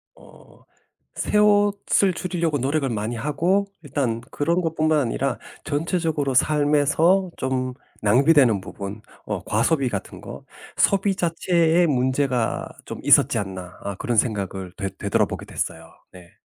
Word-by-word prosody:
어. - - -19 0.5
새 210 - -1
옷을 205 -2 +3
줄이려고 170 -3 -1
노력을 140 +1 0
많이 110 +1 -3
하고 165 - 0 0.2
일단 130 -5 -1
그런 170 +5 0
것뿐만 155 -1 +1
아니라 130 +1 -1 0.3
전체적으로 155 -2 -1
삶에서 150 +6 +3
좀 130 -1 -2 0.3
낭비되는 125 -1 +4
부분 100 +2 -7 0.2
어 - - -4
과소비 130 +5 +1
같은 100 -4 -6
거 - - -9 0.3
'소비 195 0 +2
자체에 170 0 +2
문제가 130 -3 0 0.2
좀 - - -7
있었지 - - +5
않나?' 95 -3 -6
어 100 - -4
그런 120 -2 -1
생각을 95 -5 -1
되 100 -1 -3
되돌아보게 100 -1 -1
됐어요 - - -5 0.2
네. 90 -2 -15
145 Hz, 280 characters per minute, -23 LUFS, 115-165 Hz, 0.5 s, 있었지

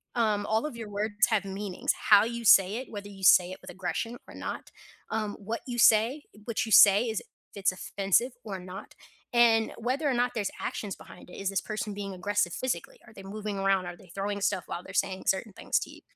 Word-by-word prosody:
um, 215 -3 +1
all 220 +5 +1
of 300 - -5
your 225 -2 -7
words 210 +1 +1
have 215 -3 +1
meanings, 195 -1 -2 0.2
how 205 0 +8
you 235 0 -4
say 195 -1 +6
it, 260 - -7
whether 205 -2 -7
you 195 -1 -12
say 180 -1 +6
it 185 - -8
with - - -11
aggression 195 +6 -4
or - - -12
not, - - -6 0.4
um, 215 -2 -2
what 220 +3 -4
you 245 -1 -4
say 230 +7 +5 0.2
what 230 -2 -1
you 220 - -7
say 200 +2 +8
is 220 - -2
if - - -20 0.3
it's 195 -2 +1
offensive 200 +6 0
or 195 -4 -5
not, 185 +2 -10 0.4
and 230 -2 +4
whether 260 +6 -1
or 265 - +1
not 245 0 +1
there's 205 -3 -1
actions 205 -3 -4
behind - - -14
it. - - -11
Is 195 -1 -2
this 195 - 0
person 215 0 -4
being 200 -1 -5
aggressive 205 0 0
physically? 240 -10 -4
Are 220 - -15
they 195 - -11
moving 205 0 -5
around? 195 -1 +2
Are 175 - -6
they 190 - -17
throwing 200 +1 -3
stuff 185 -2 0
while 175 - -5
they're 190 - -11
saying 190 0 -1
certain 195 +2 0
things - - -1
to - - -6
you? - - -14
205 Hz, 225 wpm, -28 LUFS, 195-225 Hz, 0.4 s, how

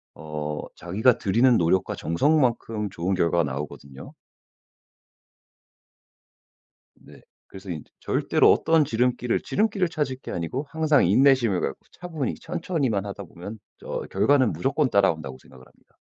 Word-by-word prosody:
어 75 -1 -5 0.2
자기가 110 +8 +2
들이는 115 +4 +3
노력과 90 +3 +1
정성만큼 115 - 0
좋은 95 +1 -2
결과가 85 -1 +2
나오거든요. 70 -1 -7 2.8
네. - - -17 0.3
그래서 95 0 -12
인제 80 -4 -7
절대로 - - +3
어떤 160 -1 +3
지름길을 125 -1 0
지름길을 205 -4 0
찾을 145 -5 -2
게 - - -7
아니고 105 - -4
항상 155 -3 +3
인내심을 120 -1 +4
갖고 - - -3
차분히 160 -7 -4
천천히만 155 - -2
하다 100 - -7
보면 100 +6 -10 0.2
저 - - -5
결과는 135 -6 +3
무조건 135 - 0
따라온다고 80 -10 +1
생각을 65 0 -17
합니다. - - -28
110 Hz, 320 characters per minute, -24 LUFS, 85-140 Hz, 2.8 s, 인내심을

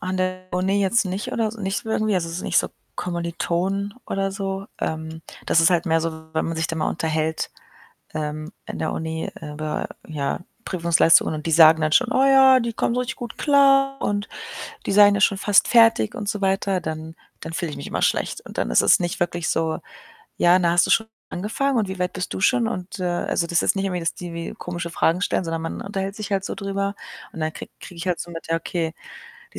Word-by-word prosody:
an 185 +1 -3
der 185 0 -2
Uni 190 +3 +1
jetzt 200 +4 +2
nicht 190 +2 -4
oder 225 -2 +1
s 220 - -8
nicht 195 -2 -2
so - - -10
irgendwie. 215 -2 +1
Also, 170 -2 0
es 165 - -5
ist - - -5
nicht - - +2
so - - +1 0.3
Kommilitonen 180 +3 -2
oder 195 0 -1
so. 195 0 -4
Ähm, 160 0 -4 0.2
das 165 - +4
ist 165 - +5
halt 175 0 +2
mehr 165 -1 +3
so, 160 -1 -5
wenn 160 - 0
man 165 - -3
sich 160 0 0
dann 165 -1 -4
mal 155 - 0
unterhält, 160 -1 -1 0.6
ähm, 155 +1 -4
in - - -6
der 160 - -1
Uni 160 0 -3
über, 150 0 -4 0.2
ja, 145 -3 -2 0.3
Prüfungsleistungen 170 -2 +4
und 150 - -7
die 165 - -1
sagen 160 0 +7
dann 155 0 +1
schon: 250 +7 +3
„Oh 260 - +3
ja“, 265 -1 +7
die 235 0 -2
kommen 235 - 0
richtig 250 0 -2
gut 240 -3 -7
klar 275 -1 +4
und 205 0 -1 0.6
die - - -1
seien 205 0 +7
ja 200 - -1
schon 195 0 +3
fast 205 -1 +4
fertig 225 - +5
und 205 -1 -4
so 215 -2 -2
weiter, 195 0 +1
dann 160 0 -6 0.2
dann 165 - -7
fühle 170 -2 -2
ich - - -7
mich - - -7
immer - - -3
schlecht - - 0
und - - -11
dann - - -1
ist - - +5
es - - +5
nicht 175 +1 -2
wirklich 175 -1 -1
so: 160 -1 0 0.6
„Ja, 175 +1 +5
na 175 -2 +2
hast 175 +1 +4
du - - -6
schon 225 - +4 0.2
angefangen 235 +8 -1
und 210 - +1
wie 190 -1 -5
weit 180 0 -1
bist 185 - -4
du - - -4
schon?“ 240 +1 +3
Und, 185 -5 -5
äh - - -2
also, 175 -1 0
das 170 0 +2
ist - - +2
nicht 195 0 -1
irgendwie, 180 -2 -1
dass 165 -1 -2
die 175 -2 -7
wie 170 0 -5
komische 175 -1 -5
Fragen 165 +1 +1
stellen, 200 - 0
sondern 165 -1 -3
man 165 - -5
unterhält 195 0 -4
sich 215 -1 -6
halt 195 -1 +1
so - - -4
drüber 200 0 -2 0.4
und - - -8
dann 155 0 -1
kriege - - -9
kriege 180 - -11
ich 170 - -5
halt 180 -2 0
so 175 - -6
mit, 165 -1 -8
ja, 165 - +2
okay, 165 -1 -3 0.6
die - - -9
180 Hz, 235 wpm, -23 LUFS, 165-200 Hz, 0.6 s, sagen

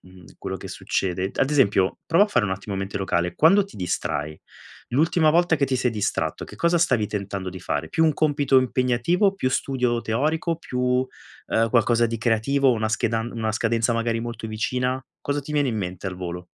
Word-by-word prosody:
mhmm, 90 -1 -17
quello - - -4
che - - -9
succede 95 0 -2
d - - -14
ad 135 - +2
esempio, 100 -10 +2
prova 170 +5 +5
a - - -6
fare 120 - +2
un - - -3
attimo 95 +1 -4
mente 95 0 -4
locale: 90 -2 -1
quando 195 - +5
ti 200 - -15
distrai 75 -4 -3 0.5
l'ultima 160 +3 +3
volta 170 0 +3
che 140 - +1
ti 130 - 0
sei 125 0 +1
distratto, 105 -3 -2
che - - -12
cosa 170 0 +2
stavi 120 -10 +2
tentando 100 -2 -4
di 95 0 -9
fare, 80 -2 -3
più 160 - +2
un 155 - +2
compito 145 -3 +3
impegnativo, 130 - +1
più 130 -10 -1
studio 125 -3 0
teorico, 155 +9 -1
più, 130 -6 -6
uhm, 125 -2 -1
qualcosa 120 0 +3
di 115 - -3
creativo, 125 +4 +2
una 110 -2 -1
schedan 115 +1 -1
una 110 -2 -2
scadenza, 115 +1 +1
magari, 115 0 0
molto 115 -1 -5
vicina, 125 +4 -2 0.2
cosa 145 0 -2
ti 145 +2 -8
viene 145 -3 +2
in 115 - -2
mente 95 -2 -4
al 95 - -3
volo? 90 -1 -6
120 Hz, 200 wpm, -24 LUFS, 100-140 Hz, 0.5 s, prova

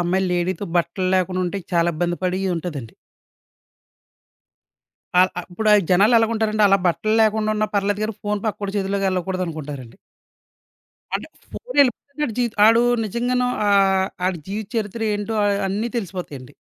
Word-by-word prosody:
అమ్మాయిలు 185 +2 0
లేడీతో 175 +2 -1
బట్టలు 175 +2 0
లేకుండా 185 0 0
ఉంటే 200 +3 -3
చాలా 170 0 +3
ఇబ్బంది 175 +2 -1
పడి 185 +1 0 0.2
ఉంటదండి. 150 -9 -6 2.3
ఆహ్, 185 +1 +5
అ - - -1
ఇప్పుడు 215 +4 +1 0.2
జనాలు 200 +6 +5
ఎలాగుంటారండి 220 -1 +1
అలా 195 0 +4
బట్టలు 175 +6 +1
లేకుండా 215 0 +1
ఉన్నా 215 0 0
పర్లేదు 200 +1 0
గాని, 220 0 -4
ఫోను 210 0 -2
పక్కోడి 200 -1 -3
చేతిలోకెళ్ళకూడదనుకుంటారండి. 185 - -3 1.2
అంటే - - -3 0.2
ఫోను - - -6
ఎళ్లిపోతేనే 280 +3 -2
ఆడి 225 - -6
జీ 245 - +3 0.2
ఆడు 230 +1 +5 0.2
నిజంగానో 245 +4 0 0.2
ఆహ్, 195 -1 +3 0.2
ఆడి 185 -2 -1
జీవిత 205 0 -4
చరిత్ర 220 +1 -3
ఏంటో 205 +2 -3
అ - - +3 0.2
అన్నీ 210 +5 -2
తెలిసిపోతాయండి. 175 - -6
195 Hz, 135 wpm, -21 LUFS, 180-215 Hz, 2.3 s, ఆహ్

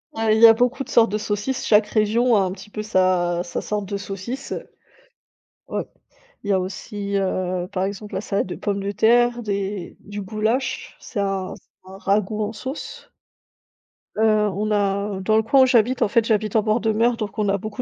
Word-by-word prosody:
Ah, 225 -1 +1
il 220 - +3
y 230 - +11
a 225 - +10
beaucoup 250 +4 0
de - - -16
sortes 230 -3 +4
de 210 - 0
saucisses, 210 +5 -2
chaque 210 -1 +4
région 225 +3 +2
a 200 - +4
un 185 -1 0
petit 195 +2 -10
peu 215 0 -5
sa 185 -4 +1
sa 175 - -4
sorte 205 -2 -3
de 200 - -3
saucisse, 200 +7 -6
heu, - - -5 1.0
ouais. - - -2 0.6
Il 205 - -3
y - - +4
a 190 - +3
aussi, 200 +2 -4
heu, 185 -2 -1
par 185 - -1
exemple, 205 +1 -5
la - - -1
salade 200 -2 -1
de 180 - -5
pomme 200 -1 -2
de 200 +1 -3
terre, 240 +3 +3
des 200 -3 -3
du 205 0 -7
goulash, 220 +6 -2
c'est 215 - -7
un 195 -2 -1
c'est 185 - -20
un 195 - -10
ragoût 210 +2 0
en 210 - -4
sauce. 260 +6 -7 1.1
Heu, 215 - -1 0.3
on 210 +3 -2
a 200 -1 0
dans 215 +3 +2
le 220 - +3
coin 265 +4 +5
où - - +6
j'habite 245 0 +2
en - - +3
fait, 225 +2 +2
j'habite 215 -2 0
en 220 - +5
bord 215 +2 +2
de 220 0 +1
mer, 230 +2 +2
donc 215 -2 -5
on 210 -1 +1
a 200 - +2
beaucoup 215 +4 -5
210 Hz, 215 wpm, -22 LUFS, 195-225 Hz, 1.1 s, y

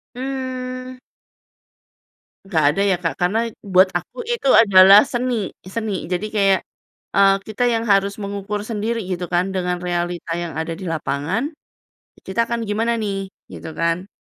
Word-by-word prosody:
Mmm 255 -1 -5 1.5
Nggak 165 -6 +1
ada 200 - 0
ya - - +3
Kak, 165 - 0
karena 185 +5 +2 0.3
buat 185 +1 +6
aku - - -12
itu 470 - -1
adalah 195 -1 +8
seni, 250 0 -1 0.4
seni. 220 -3 -2 0.2
Jadi 180 +4 -1
kayak, 195 -2 +4 0.6
eee, 195 0 +6
kita 215 +3 -2
yang 225 0 0
harus 200 0 +3
mengukur 200 +1 -4
sendiri 225 +2 -2
gitu 180 0 -2
kan 175 +2 +3
dengan 180 -1 -1
realita 175 -1 -2
yang 170 - -5
ada 165 +1 -3
di - - -8
lapangan, 155 - -2 0.8
"Kita 190 +4 -4
akan 235 -1 -2
gimana 225 +3 +1
nih?" 200 -2 -2 0.3
Gitu - - -8
kan. 170 +3 0
200 Hz, 145 wpm, -21 LUFS, 180-230 Hz, 1.5 s, adalah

